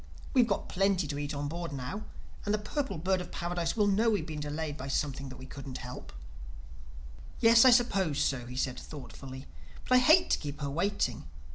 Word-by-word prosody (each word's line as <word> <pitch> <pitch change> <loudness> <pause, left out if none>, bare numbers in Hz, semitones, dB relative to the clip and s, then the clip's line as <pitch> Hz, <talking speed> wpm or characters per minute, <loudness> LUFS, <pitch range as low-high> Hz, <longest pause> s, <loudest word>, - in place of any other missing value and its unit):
We've 250 -4 +5
got 200 - -1
plenty 195 -2 +1
to 145 -1 -3
eat 145 0 -3
on 145 0 -2
board 170 +2 -4
now; 140 +11 -5 0.4
and 205 - -1
the 210 - +3
Purple 210 - -3
Bird 185 +3 +1
of - - -8
Paradise 175 +1 -2
will 210 - +4
know 205 +3 +3
that - - +5
we 210 -2 +2
have - - -8
been 155 -2 -5
delayed 150 0 -3
by 135 -1 -6
something 140 -1 -2
that 130 - -9
we 130 - -10
couldn't 135 -1 -7
help." 125 0 -8 1.3
"Yes, 230 +1 +7
I - - +10
suppose 195 - +3
so," 125 -3 0
he 125 - -8
said 130 -1 -1
thoughtfully. 135 -2 -9 0.4
"But - - +2
I 255 - +8
hate 315 +8 +5
to - - +3
keep 145 -1 -6
her 140 -1 -2
waiting. 165 - -1
160 Hz, 215 wpm, -30 LUFS, 140-205 Hz, 1.3 s, I